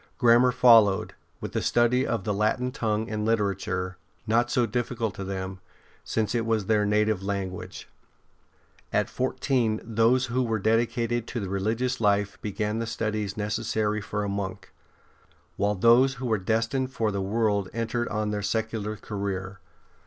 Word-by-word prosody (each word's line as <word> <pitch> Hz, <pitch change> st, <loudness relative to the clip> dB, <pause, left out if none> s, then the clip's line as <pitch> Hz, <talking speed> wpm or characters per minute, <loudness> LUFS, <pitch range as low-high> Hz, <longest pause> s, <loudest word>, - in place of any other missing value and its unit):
Grammar 120 Hz, 0 st, +5 dB
followed, 115 Hz, -5 st, +5 dB, 0.3 s
with -, -, -5 dB
the -, -, -1 dB
study 120 Hz, +2 st, +2 dB
of 115 Hz, -5 st, -1 dB
the 105 Hz, -, -1 dB
Latin 110 Hz, +5 st, 0 dB
tongue 110 Hz, -2 st, -1 dB
and 110 Hz, -2 st, -3 dB
literature, 100 Hz, -4 st, -1 dB, 0.3 s
not 120 Hz, +2 st, +2 dB
so 125 Hz, -2 st, +2 dB
difficult 115 Hz, -1 st, -2 dB
to 100 Hz, -, -6 dB
them, 95 Hz, -1 st, -5 dB, 0.4 s
since 110 Hz, -1 st, -1 dB
it 120 Hz, -1 st, +1 dB
was 110 Hz, -3 st, 0 dB
their 105 Hz, 0 st, +2 dB
native 105 Hz, -1 st, +2 dB
language. 95 Hz, -2 st, -5 dB, 1.0 s
At -, -, 0 dB
fourteen 125 Hz, -3 st, 0 dB
those 115 Hz, +3 st, +2 dB
who 125 Hz, +1 st, -1 dB
were 115 Hz, -3 st, 0 dB
dedicated 115 Hz, +2 st, 0 dB
to 120 Hz, -, -4 dB
the 100 Hz, -3 st, -4 dB
religious 115 Hz, +6 st, -1 dB
life 100 Hz, -1 st, +1 dB
began 105 Hz, +1 st, -2 dB
the 115 Hz, -, -3 dB
studies 110 Hz, -2 st, -2 dB
necessary 105 Hz, 0 st, -1 dB
for 105 Hz, +1 st, -3 dB
a -, -, -2 dB
monk; 100 Hz, -1 st, -5 dB, 0.8 s
while 105 Hz, +1 st, +1 dB
those 120 Hz, +6 st, +5 dB
who 130 Hz, 0 st, -6 dB
were 110 Hz, -4 st, +1 dB
destined 115 Hz, +6 st, 0 dB
for 115 Hz, -4 st, -1 dB
the 100 Hz, -1 st, -2 dB
world 100 Hz, -1 st, 0 dB
entered 115 Hz, +1 st, -2 dB
on 105 Hz, -1 st, -2 dB
their 105 Hz, -1 st, -2 dB
secular 110 Hz, 0 st, -2 dB
career. 95 Hz, -3 st, -4 dB
110 Hz, 155 wpm, -26 LUFS, 100-115 Hz, 1.0 s, Grammar